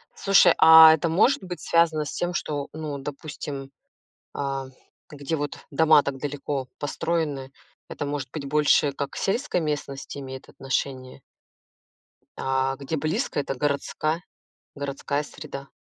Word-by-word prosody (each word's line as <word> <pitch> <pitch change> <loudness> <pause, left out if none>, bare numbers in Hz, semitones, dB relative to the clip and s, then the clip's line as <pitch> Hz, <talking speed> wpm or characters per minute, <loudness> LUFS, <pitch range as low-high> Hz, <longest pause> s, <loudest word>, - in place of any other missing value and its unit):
Слушай, 195 -3 +5
а 160 0 +10
это 160 +1 0
может 195 +8 +3
быть 180 -3 -6
связано 165 -2 +2
с - - -5
тем, 175 0 -2
что, 145 -4 -3
ну, 155 -2 -5
допустим, 140 -1 -7 0.6
а, 135 -1 -3 0.4
где 145 +2 -4
вот 145 -1 -4
дома 155 0 +5
так 140 -1 -3
далеко 140 -1 -4
построены, 145 -2 -2 0.4
это - - -4
может 140 -2 -4
быть 155 -3 -6
больше 150 0 +3
как 140 0 -4
к - - -12
сельской 200 -1 0
местности 145 -3 -4
имеет 130 -1 -8
отношение? 130 -1 -4 1.2
А, 135 0 0
где 140 +3 -4
близко, 155 0 -1
это 140 - -2
городская 150 +4 -1 0.5
городская 140 0 -3
среда. 140 -2 -9
145 Hz, 135 wpm, -25 LUFS, 140-160 Hz, 1.2 s, а